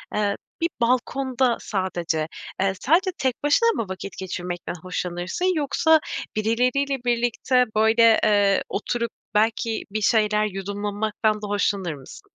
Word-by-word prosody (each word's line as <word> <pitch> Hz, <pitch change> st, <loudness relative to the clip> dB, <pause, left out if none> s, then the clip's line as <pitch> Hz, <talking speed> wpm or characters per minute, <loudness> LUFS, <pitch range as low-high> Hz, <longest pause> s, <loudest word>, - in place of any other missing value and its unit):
eee, 205 Hz, -1 st, +1 dB, 0.3 s
bir 335 Hz, -, +2 dB
balkonda 255 Hz, 0 st, +1 dB
sadece, 175 Hz, -5 st, -2 dB, 0.3 s
eee, 195 Hz, 0 st, +2 dB
sadece 360 Hz, +7 st, +3 dB
tek 260 Hz, -1 st, -2 dB
başına 465 Hz, +11 st, +4 dB
mı 230 Hz, -, -1 dB
vakit 190 Hz, +1 st, -7 dB
geçirmekten 175 Hz, -2 st, -5 dB
hoşlanırsın 185 Hz, -, -2 dB
yoksa 315 Hz, +2 st, +3 dB, 0.4 s
birileriyle 250 Hz, +6 st, +1 dB
birlikte, 245 Hz, +1 st, +2 dB
böyle, 225 Hz, +1 st, +5 dB
eee, 205 Hz, -2 st, +3 dB
oturup 235 Hz, +2 st, -2 dB, 0.2 s
belki 225 Hz, +1 st, +1 dB
bir 215 Hz, +1 st, -2 dB
şeyler 210 Hz, -1 st, +3 dB
yudumlanmaktan 205 Hz, +2 st, -1 dB
da 210 Hz, -, -5 dB
hoşlanır 200 Hz, -4 st, 0 dB
mısın? 135 Hz, -3 st, -12 dB
215 Hz, 120 wpm, -23 LUFS, 195-250 Hz, 0.4 s, böyle